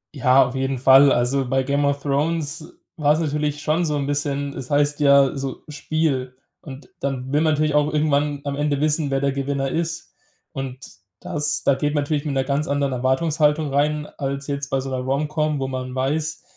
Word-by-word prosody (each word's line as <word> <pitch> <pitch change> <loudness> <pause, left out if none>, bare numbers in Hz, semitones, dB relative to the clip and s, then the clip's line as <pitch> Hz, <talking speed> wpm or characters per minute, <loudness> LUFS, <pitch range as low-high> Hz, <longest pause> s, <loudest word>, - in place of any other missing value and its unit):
Ja, 130 0 +4
auf 125 - -5
jeden 135 0 -1
Fall. 135 +2 +6
Also 125 +1 +1
bei 135 0 +1
„Game 140 +2 0
of 140 0 -1
Thrones“ 155 +2 -2 0.3
war 150 -1 +3
es 155 - -1
natürlich 150 -1 -2
schon 160 +3 +1
so 150 -2 -1
'n 140 - -2
bisschen 145 0 -2
es 130 0 -7
heißt 145 0 +1
ja 140 -1 +5
so: 135 -1 -5
Spiel. 140 -4 -2 0.3
Und 135 -1 -10
dann 135 0 -4
will 150 - +3
man 160 -1 +3
natürlich 150 0 0
auch 150 0 +2
irgendwann 150 -1 0
am 140 - -2
Ende 145 -1 0
wissen, 150 -1 +1
wer 135 0 0
der 140 0 +1
Gewinner 135 0 -2
ist. 165 +1 -3 0.4
Und 135 -1 -6 0.3
dass 150 0 -1
da 140 - +4
geht 145 +2 -1
man 145 - +1
natürlich 145 0 -2
mit 140 -3 -2
einer 135 - +1
ganz 140 +2 -1
anderen 140 -1 0
Erwartungshaltung 150 +3 +1
rein, 150 +1 +1
als 140 0 -3
jetzt 140 -1 -4
bei 135 - 0
so 135 +1 -5
'ner 130 - -2
Romcom, 150 +3 -1
wo 135 - -2
man 130 -1 -5
weiß, 150 +4 -2
140 Hz, 205 wpm, -22 LUFS, 135-150 Hz, 0.4 s, Fall